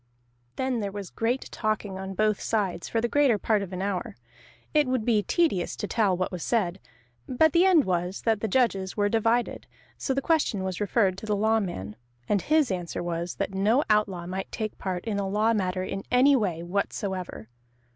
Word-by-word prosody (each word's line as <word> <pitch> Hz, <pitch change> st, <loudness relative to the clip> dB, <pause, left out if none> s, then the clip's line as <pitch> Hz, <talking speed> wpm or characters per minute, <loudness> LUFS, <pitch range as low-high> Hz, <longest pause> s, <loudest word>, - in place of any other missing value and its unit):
Then 260 Hz, -2 st, -1 dB
there 200 Hz, -2 st, -3 dB
was 200 Hz, -2 st, -7 dB
great 240 Hz, +3 st, -1 dB
talking 215 Hz, -3 st, -2 dB
on 190 Hz, 0 st, -6 dB
both 215 Hz, +1 st, +1 dB
sides, 195 Hz, -6 st, -1 dB
for 225 Hz, -, 0 dB
the 240 Hz, -, +1 dB
greater 275 Hz, -3 st, +3 dB
part 210 Hz, 0 st, +1 dB
of 195 Hz, -2 st, -6 dB
an 185 Hz, 0 st, -3 dB
hour: 195 Hz, -2 st, -3 dB, 0.6 s
it 300 Hz, -2 st, +4 dB
would 255 Hz, -4 st, 0 dB
be 220 Hz, -3 st, +3 dB
tedious 250 Hz, -, +1 dB
to -, -, -4 dB
tell 200 Hz, -5 st, +1 dB
what 185 Hz, +1 st, -1 dB
was 180 Hz, -2 st, -5 dB
said. 195 Hz, -4 st, 0 dB, 0.5 s
But 295 Hz, +4 st, +3 dB
the 345 Hz, +2 st, +5 dB
end 355 Hz, -6 st, +6 dB
was, 180 Hz, +1 st, -2 dB
that 225 Hz, -2 st, +2 dB
the 220 Hz, -, -1 dB
judges 195 Hz, -5 st, +1 dB
were 205 Hz, 0 st, +2 dB
divided, 230 Hz, +2 st, 0 dB, 0.3 s
so 265 Hz, -, -1 dB
the -, -, +2 dB
question 275 Hz, -, +1 dB
was 190 Hz, +1 st, -3 dB
referred 195 Hz, -2 st, +1 dB
to 215 Hz, -, -9 dB
the 210 Hz, -, +1 dB
Lawman. 200 Hz, -, 0 dB, 0.3 s
And 200 Hz, -2 st, +2 dB
his 305 Hz, -6 st, +2 dB
answer 175 Hz, -2 st, -3 dB
was, 170 Hz, 0 st, -3 dB
that -, -, -3 dB
no 215 Hz, +9 st, +3 dB
outlaw 195 Hz, -5 st, +1 dB
might 190 Hz, +2 st, -5 dB
take 215 Hz, -2 st, -4 dB
part 185 Hz, -2 st, -3 dB
in 210 Hz, -3 st, -1 dB
a 195 Hz, -1 st, -2 dB
law 215 Hz, +3 st, +2 dB
matter 185 Hz, -3 st, -1 dB
in 195 Hz, +1 st, -4 dB
any 265 Hz, +3 st, +5 dB
way 180 Hz, -9 st, -1 dB
whatsoever. 190 Hz, -, -3 dB
205 Hz, 195 wpm, -27 LUFS, 185-230 Hz, 0.6 s, end